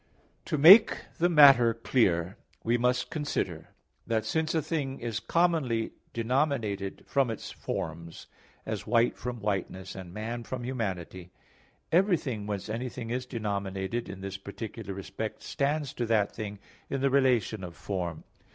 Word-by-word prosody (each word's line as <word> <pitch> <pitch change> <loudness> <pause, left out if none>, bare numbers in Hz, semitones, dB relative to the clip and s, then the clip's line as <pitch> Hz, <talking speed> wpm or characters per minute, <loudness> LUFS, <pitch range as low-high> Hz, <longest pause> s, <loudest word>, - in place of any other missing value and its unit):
To 155 - -1
make 190 +10 +9 0.2
the 175 +1 +4
matter 135 -8 +7
clear, 95 -7 +1 0.3
we 115 +1 +2
must 125 +1 +1
consider 120 - -3 0.4
that 110 -2 0
since 160 +6 0
a 160 - +2
thing 140 -4 -2
is 115 -2 -3
commonly 155 -10 +1 0.2
denominated 115 -5 -1
from 135 -3 +1
its 110 - -5
forms, 85 +1 -5 0.4
as - - -4
"white" 120 0 +3
from 125 -1 -5
whiteness, 95 -2 -3
and 95 -2 -9
"man" 115 +4 -4
from 125 +1 -5
humanity; 95 -8 -4 0.6
everything 160 - +1
whence 100 -2 -3
anything 115 +1 -4
is 125 +1 -2
denominated, 100 -1 -3
in 95 0 -8
this 95 0 -5
particular 100 +1 -7
respect 105 +3 -5
stands 145 0 -1
to 120 - -2
that 110 -3 +2
thing 105 -2 -5 0.3
in 135 - -2
the 135 0 +2
relation 125 -7 +2
of 85 -2 -7
form. 90 -5 -4
115 Hz, 140 wpm, -29 LUFS, 100-135 Hz, 0.6 s, make